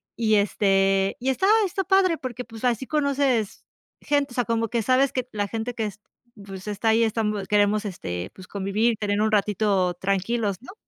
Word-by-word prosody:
Y 220 Hz, -2 st, +2 dB
este, 195 Hz, -1 st, +2 dB
y 255 Hz, +2 st, -1 dB
estaba, 380 Hz, +10 st, +2 dB
está 385 Hz, +1 st, -2 dB
padre 380 Hz, -3 st, +3 dB
porque 250 Hz, -3 st, -6 dB
pues 225 Hz, 0 st, -12 dB
así 245 Hz, +1 st, 0 dB
conoces 280 Hz, -7 st, 0 dB, 0.4 s
gente, 285 Hz, -3 st, 0 dB
o -, -, -10 dB
sea, 245 Hz, -, 0 dB
como 230 Hz, 0 st, 0 dB
que 235 Hz, -2 st, 0 dB
sabes 260 Hz, +4 st, +3 dB
que 255 Hz, -1 st, -3 dB
la 205 Hz, -1 st, -2 dB
gente 225 Hz, +3 st, -4 dB
que 225 Hz, -2 st, -2 dB
es 210 Hz, -1 st, -7 dB, 0.4 s
pues, 195 Hz, 0 st, -9 dB
está 210 Hz, +2 st, -1 dB
ahí 225 Hz, +1 st, +4 dB
estamos, 210 Hz, -3 st, -1 dB
queremos, 210 Hz, +1 st, +2 dB
este, 90 Hz, -, -5 dB
pues, 185 Hz, -1 st, -13 dB
convivir, 205 Hz, +4 st, 0 dB
tener 205 Hz, 0 st, -1 dB
un 215 Hz, 0 st, +1 dB
ratito 200 Hz, -3 st, +1 dB
tranquilos, 200 Hz, +1 st, -1 dB
¿no? 260 Hz, -, -11 dB
220 Hz, 190 wpm, -24 LUFS, 200-250 Hz, 0.4 s, ahí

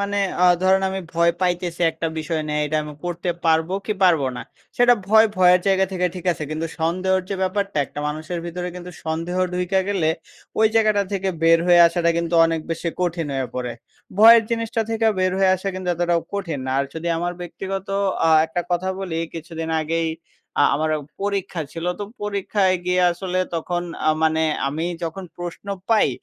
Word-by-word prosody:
মানে 200 Hz, 0 st, -2 dB, 0.3 s
আ -, -, +7 dB, 0.2 s
ধরেন 190 Hz, +1 st, +4 dB
আমি 190 Hz, -, -3 dB
ভয় 170 Hz, 0 st, +3 dB
পাইতেছি 175 Hz, -1 st, -1 dB
১ -, -, -18 dB
টা -, -, +2 dB
বিষয় 155 Hz, 0 st, -2 dB
নিয়ে 150 Hz, 0 st, -1 dB
এইডা 155 Hz, +1 st, -1 dB
আমি 150 Hz, 0 st, -7 dB
করতে 175 Hz, 0 st, -2 dB
পারবো 160 Hz, +1 st, +2 dB
কি 215 Hz, -, +1 dB
পারব 170 Hz, -5 st, +5 dB, 0.2 s
না?সেটা 245 Hz, -, +1 dB
ভয় 220 Hz, +2 st, +6 dB
ভয়ের 180 Hz, -1 st, +5 dB
জায়গা 190 Hz, 0 st, +3 dB
থেকে 180 Hz, -1 st, +1 dB
ঠিক 180 Hz, -1 st, -8 dB
আছে। 155 Hz, -, -6 dB
কিন্তু 155 Hz, +1 st, -2 dB
সন্দেহর 185 Hz, +3 st, +1 dB
যে 195 Hz, -, 0 dB
ব্যাপারটা 200 Hz, -1 st, -1 dB
১ -, -, -17 dB
টা 145 Hz, -, -4 dB
মানুষের 155 Hz, +3 st, -4 dB
ভিতরে 180 Hz, +1 st, -4 dB
কিন্তু 180 Hz, 0 st, -8 dB
সন্দেহ 165 Hz, +3 st, -3 dB, 0.2 s
ঢুইকা 180 Hz, +1 st, +1 dB
গেলে 185 Hz, -6 st, +1 dB, 0.5 s
ওই 220 Hz, -, +6 dB
জায়গাটা 215 Hz, -2 st, +3 dB
থেকে 195 Hz, -1 st, -1 dB
বের 165 Hz, 0 st, +6 dB
হয়ে 175 Hz, -1 st, +6 dB
আসাটা 170 Hz, 0 st, +1 dB
কিন্তু 170 Hz, 0 st, -2 dB
অনেক 165 Hz, -1 st, -1 dB
বেশি 165 Hz, +1 st, -2 dB
কঠিন 170 Hz, -3 st, -1 dB
হয়ে 130 Hz, -1 st, -1 dB
পড়ে। 125 Hz, -1 st, -3 dB, 0.5 s
ভয়ের 230 Hz, +1 st, +9 dB
জিনিসটা 230 Hz, 0 st, -1 dB
থেকে 225 Hz, 0 st, +1 dB
বের 185 Hz, 0 st, +2 dB
হয়ে 190 Hz, -1 st, +4 dB
আসছে 190 Hz, +2 st, -4 dB
কিন্তু 185 Hz, -1 st, -5 dB
এতটাও 175 Hz, 0 st, +1 dB
কঠিন 170 Hz, -9 st, -3 dB
না। -, -, -2 dB
আর 140 Hz, -, +1 dB
যদি 165 Hz, +1 st, -3 dB
আমার 175 Hz, +1 st, -2 dB
ব্যক্তিগত 190 Hz, +2 st, -5 dB, 0.4 s
আ -, -, +4 dB, 0.2 s
একটা 170 Hz, +2 st, -2 dB
কথা 180 Hz, +2 st, 0 dB
বলি 180 Hz, -4 st, -4 dB, 0.2 s
কিছুদিন 165 Hz, 0 st, -6 dB
আগেই 165 Hz, +1 st, -1 dB, 0.5 s
আ -, -, +6 dB
আমার 155 Hz, +2 st, 0 dB, 0.3 s
পরীক্ষা 195 Hz, -4 st, -2 dB
ছিল। 165 Hz, 0 st, -6 dB
তো 205 Hz, -, -3 dB, 0.2 s
পরীক্ষায় 200 Hz, -2 st, +1 dB
গিয়া 180 Hz, 0 st, +3 dB
আসলে 185 Hz, +1 st, -3 dB, 0.2 s
তখন 175 Hz, +2 st, -2 dB, 0.3 s
আ -, -, +6 dB
মানে 160 Hz, 0 st, +2 dB, 0.3 s
আমি 155 Hz, +4 st, -3 dB, 0.2 s
যখন 170 Hz, +3 st, -4 dB
প্রশ্ন 175 Hz, +2 st, -7 dB, 0.2 s
পাই 220 Hz, -7 st, +4 dB
175 Hz, 190 wpm, -22 LUFS, 165-190 Hz, 0.5 s, ভয়ের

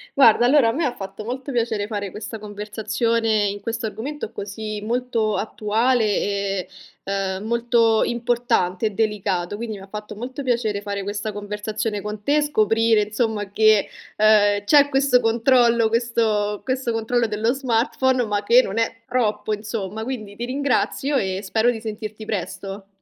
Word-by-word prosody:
Guarda 240 Hz, -3 st, +6 dB
allora 260 Hz, -3 st, +5 dB
a -, -, +2 dB
me 280 Hz, -2 st, -1 dB
fatto 195 Hz, +2 st, -7 dB
molto 255 Hz, +4 st, -5 dB
piacere 225 Hz, -4 st, -1 dB
fare 205 Hz, -3 st, -4 dB
questa 220 Hz, +1 st, -7 dB
conversazione 215 Hz, +1 st, -1 dB
in 200 Hz, +1 st, -4 dB
questo 230 Hz, 0 st, -3 dB
argomento 225 Hz, +4 st, -5 dB
così 210 Hz, +1 st, -6 dB
molto 230 Hz, -1 st, -1 dB
attuale 225 Hz, +3 st, +1 dB
e, 200 Hz, -2 st, -1 dB, 0.3 s
ehm, 195 Hz, 0 st, -2 dB
molto 235 Hz, -1 st, +2 dB
importante 235 Hz, -5 st, 0 dB
e -, -, -1 dB
delicato. 200 Hz, -3 st, -1 dB
Quindi 225 Hz, -2 st, -5 dB
mi 195 Hz, -, -11 dB
ha -, -, -12 dB
fatto 210 Hz, +1 st, -7 dB
molto 255 Hz, +5 st, -6 dB
piacere 230 Hz, -5 st, 0 dB
fare 200 Hz, -1 st, -4 dB
questa 205 Hz, +2 st, -3 dB
conversazione 210 Hz, +1 st, -4 dB
con 210 Hz, 0 st, -6 dB
te 290 Hz, +5 st, +2 dB
e -, -, +3 dB
scoprire 225 Hz, -5 st, +3 dB
insomma 210 Hz, -1 st, -2 dB
che, 215 Hz, 0 st, +4 dB, 0.3 s
ehm, 205 Hz, -1 st, +4 dB
c'è 285 Hz, +3 st, +5 dB
questo 270 Hz, -2 st, +3 dB
controllo, 235 Hz, 0 st, +3 dB
questo 220 Hz, -3 st, 0 dB
questo 260 Hz, -2 st, -1 dB
controllo 230 Hz, +1 st, 0 dB
dello 220 Hz, +3 st, 0 dB
smartphone 260 Hz, 0 st, +1 dB
ma 205 Hz, -1 st, -1 dB
che 240 Hz, +4 st, +6 dB
non 200 Hz, -1 st, -5 dB
è 225 Hz, 0 st, -1 dB
troppo 215 Hz, -3 st, 0 dB
insomma, 210 Hz, 0 st, -4 dB
quindi 215 Hz, -5 st, -6 dB
ti 240 Hz, -, -4 dB
ringrazio 280 Hz, +1 st, 0 dB
e 190 Hz, -4 st, -1 dB
spero 220 Hz, +4 st, +2 dB
di 225 Hz, -, -5 dB
sentirti 215 Hz, -1 st, -6 dB
presto. 195 Hz, 0 st, -5 dB
220 Hz, 155 wpm, -22 LUFS, 205-240 Hz, 0.3 s, Guarda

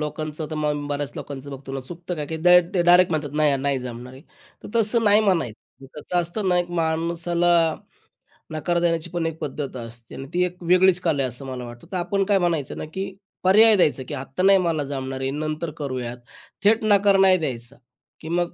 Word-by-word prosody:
लोकांचं 155 Hz, +1 st, -4 dB
तर 155 Hz, -, -3 dB
मग 150 Hz, -1 st, -1 dB
बऱ्याच 145 Hz, -1 st, -3 dB
लोकांचं 140 Hz, 0 st, -7 dB
बघतो 135 Hz, 0 st, -8 dB
ना, 135 Hz, -, -3 dB
चुकतं 175 Hz, +6 st, -7 dB
काय 150 Hz, -2 st, -5 dB, 0.2 s
डे 180 Hz, 0 st, +8 dB
ते 175 Hz, -, +3 dB
डायरेक्ट 180 Hz, +1 st, +6 dB
म्हणतात 150 Hz, -3 st, -2 dB
नाही 145 Hz, -2 st, +3 dB
नाही 135 Hz, 0 st, 0 dB
जमणार 125 Hz, 0 st, -8 dB
आहे. 130 Hz, -, -13 dB, 0.4 s
तर -, -, -7 dB
तसं 230 Hz, +1 st, +3 dB
नाही 205 Hz, +1 st, +5 dB
म्हणायचं, 160 Hz, -, -2 dB
कसं 175 Hz, +4 st, -3 dB
असतं 185 Hz, +4 st, -2 dB
ना 180 Hz, -, +3 dB
एक 175 Hz, 0 st, -2 dB
माणसाला 170 Hz, +1 st, 0 dB, 1.0 s
नकार 170 Hz, +3 st, -1 dB
देण्याची 165 Hz, -2 st, 0 dB
पण 175 Hz, -2 st, -2 dB
एक 165 Hz, -1 st, -3 dB
पद्धत 140 Hz, -1 st, -5 dB
असते 115 Hz, 0 st, -11 dB
आणि 135 Hz, +1 st, -7 dB
ती 180 Hz, +1 st, +2 dB
एक 180 Hz, 0 st, -6 dB
वेगळीच 185 Hz, 0 st, +5 dB
कला 160 Hz, -6 st, +1 dB
आहे -, -, 0 dB
असं 125 Hz, +3 st, -4 dB
मला 130 Hz, -1 st, -6 dB
वाटतं. 120 Hz, 0 st, -12 dB
तर 185 Hz, -, -2 dB
आपण 195 Hz, +3 st, 0 dB
काय 200 Hz, 0 st, +3 dB
म्हणायचं 165 Hz, -6 st, -1 dB
ना, -, -, -5 dB
की 190 Hz, 0 st, -4 dB, 0.3 s
पर्याय 215 Hz, +4 st, +6 dB
द्यायचा, 150 Hz, -8 st, +2 dB
की -, -, -6 dB
आत्ता 135 Hz, +5 st, -4 dB
नाही 195 Hz, 0 st, +6 dB
मला 165 Hz, -5 st, 0 dB
जमणार 135 Hz, -1 st, -4 dB
आहे, 135 Hz, -, -1 dB
नंतर 155 Hz, +2 st, -3 dB
करूयात. 130 Hz, -4 st, -4 dB, 0.5 s
थेट 220 Hz, +2 st, +4 dB
नकार 200 Hz, -2 st, +4 dB
नाही 190 Hz, -1 st, +6 dB
द्यायचा 130 Hz, -5 st, -5 dB, 0.5 s
की 160 Hz, -, -8 dB
मग 175 Hz, 0 st, -1 dB
160 Hz, 205 wpm, -23 LUFS, 140-180 Hz, 1.0 s, डे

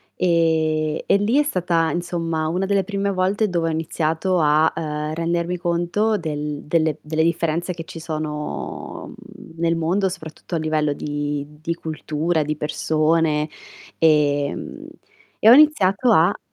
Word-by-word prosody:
E 160 Hz, -3 st, +1 dB
e -, -, +4 dB
lì 225 Hz, +8 st, +2 dB
è -, -, +4 dB
stata, 175 Hz, -, 0 dB
insomma, 165 Hz, -2 st, -2 dB
una 185 Hz, +3 st, -1 dB
delle 195 Hz, 0 st, +1 dB
prime 200 Hz, +1 st, -2 dB
volte 195 Hz, +3 st, +1 dB
dove 170 Hz, -2 st, 0 dB
ho -, -, -1 dB
iniziato 165 Hz, +3 st, -1 dB
a, 155 Hz, +1 st, +4 dB
ehm, 150 Hz, -1 st, -3 dB
rendermi 170 Hz, +2 st, -1 dB
conto 175 Hz, +6 st, 0 dB
del 150 Hz, -3 st, -4 dB
delle 155 Hz, -1 st, +1 dB
delle 155 Hz, +1 st, -1 dB
differenze 170 Hz, +1 st, 0 dB
che 165 Hz, -1 st, -8 dB
ci 165 Hz, -, -9 dB
sono, 155 Hz, -2 st, -5 dB
mhmm, -, -, -14 dB
nel 165 Hz, 0 st, +2 dB
mondo, 185 Hz, +4 st, +1 dB
soprattutto 165 Hz, -1 st, -7 dB
a -, -, +1 dB
livello 155 Hz, -1 st, 0 dB
di 145 Hz, 0 st, -3 dB, 0.2 s
di 165 Hz, +1 st, -2 dB
cultura, 160 Hz, 0 st, -2 dB
di 150 Hz, 0 st, -3 dB
persone, 155 Hz, 0 st, +1 dB, 0.5 s
ehm, 145 Hz, -3 st, +1 dB, 0.5 s
e 220 Hz, -, +6 dB
ho -, -, +10 dB
iniziato 250 Hz, -7 st, +5 dB
a 165 Hz, -2 st, +4 dB
165 Hz, 145 wpm, -21 LUFS, 155-180 Hz, 0.5 s, ho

